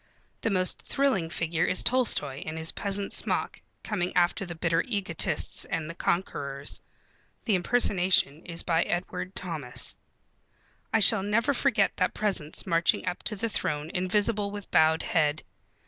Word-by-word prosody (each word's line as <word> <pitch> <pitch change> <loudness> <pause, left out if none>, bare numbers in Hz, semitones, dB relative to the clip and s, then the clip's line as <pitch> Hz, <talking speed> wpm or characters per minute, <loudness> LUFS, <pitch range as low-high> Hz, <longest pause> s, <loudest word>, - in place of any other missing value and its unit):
The - - 0
most 185 -2 +2
thrilling 260 -12 0
figure 165 0 -1
is 185 - +4
Tolstoi 180 - +1
in 155 +1 -6
his 160 0 -2
peasant 200 0 -1
smock, - - -1 0.2
coming 185 -4 -2
after 180 +2 +1
the 170 - -7
bitter 165 0 +1
egotists 200 -8 0
and 165 0 -4
conquerors. 140 -6 -3 0.6
(The 220 - +1
impersonation 180 - +2
is 170 -1 -4
by 165 -1 +1
Edward 185 +2 -4
Thomas.) 155 -9 -1 0.9
I 225 - +2
shall 210 +1 +8
never 220 +7 +1
forget 245 -7 +1
that 185 - 0
presence 190 -8 -1
marching 165 0 +1
up 180 - -3
to 215 - 0
the 225 +3 -2
throne 150 -6 -2
invisible 205 +3 0
with 205 -1 -9
bowed 160 0 +3
head. 150 -2 0
180 Hz, 145 wpm, -27 LUFS, 165-205 Hz, 0.9 s, shall